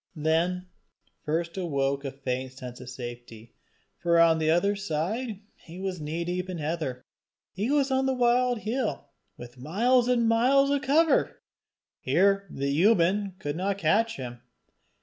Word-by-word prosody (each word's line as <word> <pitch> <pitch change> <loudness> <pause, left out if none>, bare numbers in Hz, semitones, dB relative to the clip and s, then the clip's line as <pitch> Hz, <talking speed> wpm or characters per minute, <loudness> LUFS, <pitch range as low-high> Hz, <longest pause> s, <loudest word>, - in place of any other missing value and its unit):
Then 165 +4 0 0.6
first 170 +3 -2
awoke 140 -6 -1
a 140 - -3
faint 130 -1 -4
sense 125 -1 -9
of 125 - -9
safety; 120 -2 -9 0.5
for 170 -1 +3
on 165 -1 +5
the 155 0 +1
other 200 +5 +2
side 200 +5 -3
he 170 +2 -13
was 190 -3 -4
knee 160 +3 -3
deep 180 +1 -3
in 180 - -4
heather. 150 -5 -3 0.5
He 205 +6 -2
was 280 -1 +2
on 265 0 +2
the 265 - +1
wild 245 -1 +2
hill, 215 - -3 0.3
with 120 +1 -11
miles 235 - +2
on 235 -2 +2
miles 265 +5 +4
of 285 -1 +1
cover! 310 +5 +2 0.6
Here 195 0 +2
the 140 -1 -2
unman 195 -1 +3
could 145 -6 -4
not 195 +3 -1
catch 205 +6 +2
him. 120 -2 -7
175 Hz, 150 wpm, -27 LUFS, 145-225 Hz, 0.6 s, on